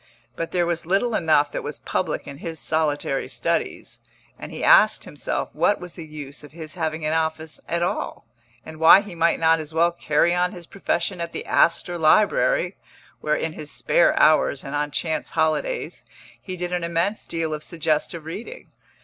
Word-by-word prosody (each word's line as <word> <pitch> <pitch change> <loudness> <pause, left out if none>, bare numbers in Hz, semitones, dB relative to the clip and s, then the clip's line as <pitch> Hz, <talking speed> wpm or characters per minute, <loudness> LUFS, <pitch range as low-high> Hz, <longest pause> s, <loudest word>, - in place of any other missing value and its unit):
But 165 - -4
there 175 -1 +1
was 170 -1 -2
little 200 +6 +1
enough 155 -5 +3
that - - -3
was - - -6
public - - -2
in 140 - -9
his 165 -2 -6
solitary 150 -3 -1
studies, - - -2 0.4
and - - -8
he - - -6
asked - - +6
himself - - -4
what 205 - +2
was 180 -1 -9
the 165 -3 -9
use 150 -2 -8
of 145 - -13
his 160 -2 -9
having 160 -2 -3
an 155 - +1
office 160 -1 -2
at 170 0 0
all, 175 - -3 0.4
and 155 0 -10
why 165 +4 +8
he 205 -3 -9
might 170 0 +2
not 165 0 +4
as 155 0 -7
well 170 +1 +4
carry 170 0 +1
on 180 0 +1
his 175 -1 -9
profession 190 0 -2
at 170 0 -4
the - - -5
Astor 170 +1 +2
Library, 215 - +3 0.4
where, 150 0 0
in 160 0 -2
his 150 -2 -8
spare 175 - +2
hours 155 -3 +4
and 140 - -7
on 145 0 -1
chance 160 +2 -2
holidays, 160 - -1 0.4
he 185 -1 -6
did 180 0 -3
an 175 -1 -1
immense 170 +5 -1
deal 165 -2 -2
of 155 0 -5
suggestive 160 -1 -2
reading. 225 - -8
165 Hz, 185 wpm, -23 LUFS, 155-175 Hz, 0.4 s, why